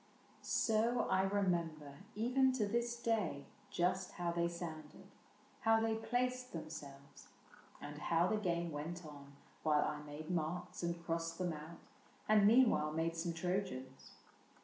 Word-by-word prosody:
So 230 Hz, +2 st, +2 dB
I 190 Hz, -, +4 dB
remember, 170 Hz, -7 st, 0 dB, 0.2 s
even 255 Hz, +4 st, +3 dB
to 235 Hz, -5 st, +1 dB
this 235 Hz, +3 st, 0 dB
day, 220 Hz, -12 st, 0 dB, 0.2 s
Just 185 Hz, +1 st, 0 dB
how 175 Hz, -1 st, -1 dB
they 170 Hz, 0 st, +1 dB
sounded, 160 Hz, -3 st, -7 dB, 0.5 s
how 225 Hz, 0 st, +4 dB
they 225 Hz, 0 st, +1 dB
placed 250 Hz, +3 st, -1 dB
them 160 Hz, -2 st, -5 dB
selves, 140 Hz, -3 st, -10 dB, 0.5 s
And 145 Hz, 0 st, -7 dB
how 165 Hz, +3 st, +2 dB
the 215 Hz, +4 st, +1 dB
game 170 Hz, -4 st, -1 dB
went 160 Hz, +4 st, -5 dB
on 140 Hz, -2 st, -11 dB, 0.3 s
while 150 Hz, -1 st, +3 dB
I 150 Hz, -1 st, -3 dB
made 150 Hz, +2 st, -7 dB
marks 175 Hz, 0 st, -2 dB
And 170 Hz, -1 st, -3 dB
crossed 165 Hz, 0 st, -2 dB
them 180 Hz, -2 st, -1 dB
out, 155 Hz, +2 st, -8 dB, 0.5 s
and 210 Hz, -1 st, +6 dB
meanwhile 225 Hz, -10 st, +5 dB
made 165 Hz, +1 st, -1 dB
some 170 Hz, +1 st, -2 dB
Trojans. 165 Hz, -7 st, -3 dB
170 Hz, 145 wpm, -37 LUFS, 155-215 Hz, 0.5 s, and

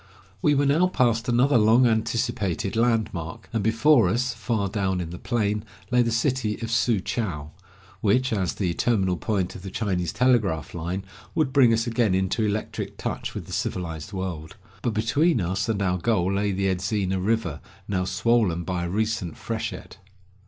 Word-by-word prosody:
We 145 Hz, -, +3 dB
were 140 Hz, +1 st, +2 dB
now 155 Hz, +6 st, +4 dB
past 120 Hz, -8 st, +1 dB
another 125 Hz, +2 st, +4 dB
long 115 Hz, +4 st, +5 dB
anticipated 110 Hz, -3 st, 0 dB
land 115 Hz, -2 st, +2 dB
mark, 80 Hz, -3 st, -6 dB
and 115 Hz, -, 0 dB
before 115 Hz, +1 st, +4 dB
us, 125 Hz, +5 st, 0 dB
far 110 Hz, -5 st, -1 dB
down 95 Hz, -2 st, -1 dB
in 85 Hz, -2 st, -4 dB
the 90 Hz, -, -7 dB
plain, 105 Hz, -3 st, -1 dB, 0.3 s
lay 125 Hz, -1 st, +4 dB
the 115 Hz, -, +1 dB
city 115 Hz, -2 st, 0 dB
of 115 Hz, -, -3 dB
Su 115 Hz, -2 st, +2 dB
chou, 85 Hz, -11 st, -3 dB, 0.5 s
which, 125 Hz, +4 st, +2 dB
as 95 Hz, -4 st, -1 dB
the 90 Hz, -4 st, -1 dB
terminal 95 Hz, -2 st, +1 dB
point 95 Hz, 0 st, -1 dB
of -, -, -9 dB
the 95 Hz, -, -7 dB
Chinese 90 Hz, -4 st, -1 dB
telegraph 110 Hz, -, +1 dB
line, 90 Hz, +3 st, -4 dB, 0.3 s
would 145 Hz, -5 st, +1 dB
bring 130 Hz, -5 st, +6 dB
us 115 Hz, 0 st, +2 dB
again 115 Hz, -5 st, +1 dB
into 95 Hz, +4 st, 0 dB
electric 105 Hz, 0 st, -3 dB
touch -, -, -4 dB
with -, -, -5 dB
the -, -, -9 dB
civilized 80 Hz, -1 st, -3 dB
world. 90 Hz, -5 st, -5 dB, 0.3 s
But 115 Hz, -1 st, -1 dB
between 145 Hz, +8 st, +2 dB
us 95 Hz, +3 st, -1 dB
and 110 Hz, -3 st, 0 dB
our 90 Hz, -1 st, 0 dB
goal 95 Hz, -2 st, +1 dB
lay 100 Hz, +1 st, 0 dB
the 95 Hz, +1 st, -1 dB
Edzina 95 Hz, 0 st, 0 dB
river, 100 Hz, -8 st, -1 dB, 0.3 s
now 95 Hz, -2 st, 0 dB
swollen 100 Hz, -3 st, +1 dB
by 90 Hz, -1 st, -2 dB
a -, -, -3 dB
recent 105 Hz, -3 st, -1 dB
freshet. -, -, -5 dB
105 Hz, 175 wpm, -25 LUFS, 95-115 Hz, 0.5 s, bring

